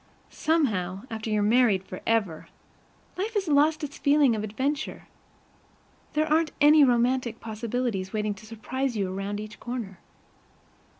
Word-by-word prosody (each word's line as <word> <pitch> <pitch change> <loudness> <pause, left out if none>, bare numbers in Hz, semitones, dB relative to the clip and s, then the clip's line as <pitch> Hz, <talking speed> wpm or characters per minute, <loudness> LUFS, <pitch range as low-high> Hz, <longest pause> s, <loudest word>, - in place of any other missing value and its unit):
Somehow, 205 - 0
after 220 0 -4
you're 210 -1 +1
married 215 -3 +3
forever, 190 -3 -2 0.7
life 435 +4 -2
has 395 -3 0
lost 305 +2 +3
its 290 -1 -6
feeling 285 -4 +4
of 215 - -3
adventure. 270 +8 -3 1.1
There 305 0 +2
aren't 315 +1 +1
any 300 +1 +7
romantic 245 -2 +2
possibilities 220 -3 -3
waiting 210 -1 -1
to 200 +2 -14
surprise 240 +3 -3
you 190 -2 -1
around 200 +2 -3
each 215 0 -8
corner. 230 -7 -6
235 Hz, 130 wpm, -26 LUFS, 210-285 Hz, 1.1 s, any